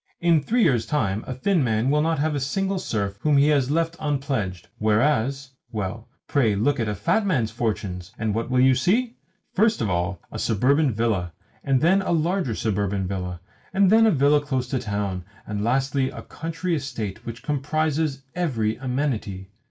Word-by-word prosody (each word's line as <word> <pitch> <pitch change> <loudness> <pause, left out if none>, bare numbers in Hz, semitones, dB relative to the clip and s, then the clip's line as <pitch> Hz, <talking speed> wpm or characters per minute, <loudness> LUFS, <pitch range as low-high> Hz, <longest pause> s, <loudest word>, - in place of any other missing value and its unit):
In 170 -3 +3
three 230 - +2
years' 125 - +2
time 110 -8 0
a 130 - -3
thin 170 +4 +1
man 115 +2 +1
will 150 +1 +3
not 160 +1 +1
have 155 +2 0
a 145 - -1
single 190 +8 -1
serf 100 - -2
whom 150 +3 +3
he 140 +2 +5
has 140 -4 +2
left 165 +2 0
unpledged; 135 - -2
whereas 130 +4 +1 0.2
well, 110 +1 -4 0.2
pray 115 -8 +2
look 130 +8 +1
at 110 -2 0
a 105 - -2
fat 105 - +1
man's 135 - 0
fortunes, 100 -6 -3
and 110 -1 -1
what 115 +2 -2
will 130 0 +2
you 130 +1 +6
see? 225 - +1 0.4
First 220 +3 +3
of 110 -4 0
all 85 +1 -1
a - - -5
suburban 135 +7 +2
villa, 105 -6 -1 0.3
and 135 -2 +2
then 185 +5 +4
a 185 - -1
larger 165 - 0
suburban 100 -3 -1
villa, 90 -2 -4 0.3
and 195 -1 +5
then 225 +1 +6
a - - +6
villa 145 -1 +4
close 130 -3 -2
to 135 - 0
a - - -1
town, 100 -4 -3 0.2
and 105 0 -3
lastly 135 +3 +1
a - - -9
country 165 +2 -4
estate 115 -7 -5
which 115 0 -7
comprises 150 0 -1
every 120 -12 -1
amenity! 125 -8 -3
130 Hz, 185 wpm, -24 LUFS, 105-150 Hz, 0.4 s, you